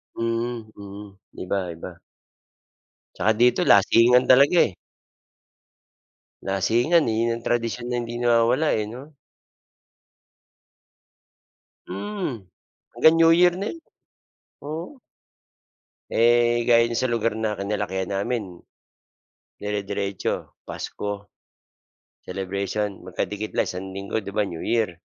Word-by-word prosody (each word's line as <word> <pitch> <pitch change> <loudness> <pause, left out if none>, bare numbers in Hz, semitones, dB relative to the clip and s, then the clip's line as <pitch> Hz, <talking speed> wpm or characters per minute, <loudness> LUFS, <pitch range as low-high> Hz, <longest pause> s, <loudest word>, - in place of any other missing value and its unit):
Mhm, 115 -1 -3
mm. 100 0 -10 0.3
Iba, 100 +2 -2
iba. 85 +1 -9 1.2
Tsaka 110 - +2
dito 120 +8 +3
lasingan 115 +5 +5
talaga, 140 +6 +6
eh. - - -14 1.7
Lasingan, 120 - +2
eh, - - -1
yun 115 0 +1
ang 115 - -9
tradisyon 120 +1 -1
na 120 - 0
hindi 120 0 -5
nawawala, 120 +5 +2
eh, 105 -1 0
'no? 130 +7 -10 2.8
Mm, 140 - -4 0.5
hanggang 160 +1 +5
New 165 0 +6
Year 180 -1 +5
na 200 - -2
yun. 335 - -10 0.9
Oo. 165 - -6 1.1
Eh, 120 0 +3
gaya 115 -1 +4
nung 115 - -2
sa 130 - +1
lugar 115 -1 0
na 110 -1 -1
kinalakihan 100 -2 -3
namin. 100 -2 -3 1.1
Dirediretso 100 -1 -3
Pasko, 100 0 -6 0.9
celebration 100 +2 -3
magkadikit 105 +4 -4
lang - - 0
isang 95 +1 -5
linggo. 100 +3 -4
'Di 100 - -7
ba 105 +1 0
New 85 -3 -7
Year. 110 -6 0
115 Hz, 110 wpm, -24 LUFS, 100-120 Hz, 2.8 s, talaga